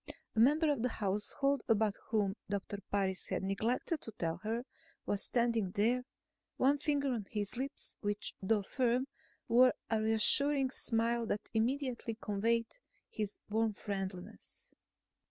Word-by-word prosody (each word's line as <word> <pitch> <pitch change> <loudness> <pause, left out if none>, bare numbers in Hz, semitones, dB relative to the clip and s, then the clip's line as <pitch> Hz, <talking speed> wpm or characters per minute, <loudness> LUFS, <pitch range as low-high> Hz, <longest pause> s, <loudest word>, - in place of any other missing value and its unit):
A - - +1
member 300 +6 +5
of 280 -6 -1
the 250 - +1
household 225 +7 0
about 220 -2 +3 0.2
whom 205 -3 +1
Doctor 200 0 -3
Parris 190 -2 -1
had - - -2
neglected 225 - -1
to 225 - -7
tell 165 -4 -2
her 225 +5 -3 0.4
was 200 -1 0
standing 235 -5 +1
there, 235 +6 +1 0.5
one 280 +2 +3
finger 280 -2 +1
on 215 -5 -4
his 205 -1 -2
lips 270 +3 -5
which, 205 0 -1
though 205 +1 +2
firm, 250 +3 +1 0.4
wore 250 +2 +5 0.2
a 220 -1 +2
reassuring 260 +5 +5
smile 230 -1 +1
that 210 - -3
immediately 240 -1 -1
conveyed 230 - 0 0.3
his 210 -2 -3
warm 220 0 0
friendliness. 190 -3 -6
225 Hz, 135 wpm, -34 LUFS, 205-250 Hz, 0.5 s, member